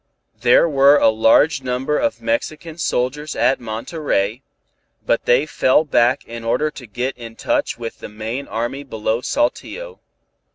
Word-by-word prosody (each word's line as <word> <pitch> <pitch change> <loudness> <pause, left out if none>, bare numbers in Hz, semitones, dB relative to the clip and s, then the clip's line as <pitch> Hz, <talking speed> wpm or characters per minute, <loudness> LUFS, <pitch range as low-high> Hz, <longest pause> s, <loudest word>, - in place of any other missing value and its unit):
There 125 +7 +5
were 140 -1 +5
a - - +5
large 115 +7 +3
number 130 +3 -1
of 290 - -1
Mexican 170 - -3
soldiers 150 +2 -1
at 125 +4 +2
Monterey, 115 - -2 0.6
but - - 0
they 125 +4 +3
fell 155 0 +2
back 125 -3 +2
in 115 0 -8
order 125 +7 0
to 125 -5 -11
get 125 +6 -3
in 115 -1 -9
touch 295 - -1
with 115 -1 -7
the - - -8
main 110 +6 -5
army 120 +5 -3
below 110 -3 -2
Saltillo. 460 - -2
130 Hz, 150 wpm, -20 LUFS, 115-150 Hz, 0.6 s, There